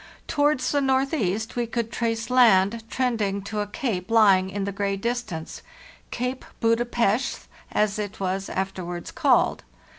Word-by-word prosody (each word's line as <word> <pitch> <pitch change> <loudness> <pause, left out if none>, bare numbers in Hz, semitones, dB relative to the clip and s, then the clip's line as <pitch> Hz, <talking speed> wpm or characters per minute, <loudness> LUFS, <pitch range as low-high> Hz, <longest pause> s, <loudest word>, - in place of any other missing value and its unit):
Towards 290 -3 +1
the 285 - +2
northeast 260 - 0
we 240 -1 -1
could 230 0 -3
trace 230 0 -2
land 225 -3 +4
trending 220 -7 -1
to 210 +1 -4
a 205 - -1
cape 210 - -3
lying 200 -5 +5
in 200 +1 -3
the 200 - -2
gray 200 0 -1
distance: 215 -7 -4 0.5
Cape 250 +2 -3 0.2
Buda 230 +1 +2
Pesth, 240 0 0 0.2
as 210 0 +1
it 205 -1 -5
was 190 0 -2
after 190 -1 -3
wards 175 0 -6
called. - - +2
220 Hz, 150 wpm, -25 LUFS, 195-245 Hz, 0.5 s, lying